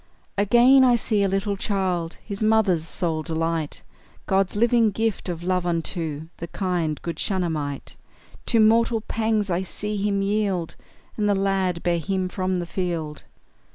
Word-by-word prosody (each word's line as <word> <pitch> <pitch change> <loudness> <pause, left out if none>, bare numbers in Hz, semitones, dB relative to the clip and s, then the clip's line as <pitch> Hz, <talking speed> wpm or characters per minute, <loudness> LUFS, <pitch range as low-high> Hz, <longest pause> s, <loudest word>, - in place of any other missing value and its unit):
Again, 240 +6 +6
I 250 -2 +5
see 220 -3 +1
a 200 - +3
little 195 +1 -1
child, 185 -4 -2
His 200 -1 -6
mother's 215 -7 +2
sole 165 -3 -1
delight, 160 -1 -2 0.4
God's 195 0 +1
living 235 +1 +4
gift 220 -1 -2
of 170 -1 -4
love 180 0 0
unto 165 -3 -2
The 170 - -6
kind, 170 -4 -2
good 170 - -4
Shunammite; 160 -7 -3 0.5
To 230 - +3
mortal 225 +1 +4
pangs 220 -2 -1
I 175 +1 +1
see 210 +3 -4
him 200 0 0
yield, 195 -4 -1 0.4
And 210 -1 +1
the 205 - +3
lad 195 -3 0
bear 170 -1 +1
him 185 +2 -1
from 185 0 -1
the 175 -1 -2
field. 170 -4 -4
190 Hz, 155 wpm, -24 LUFS, 170-210 Hz, 0.5 s, Again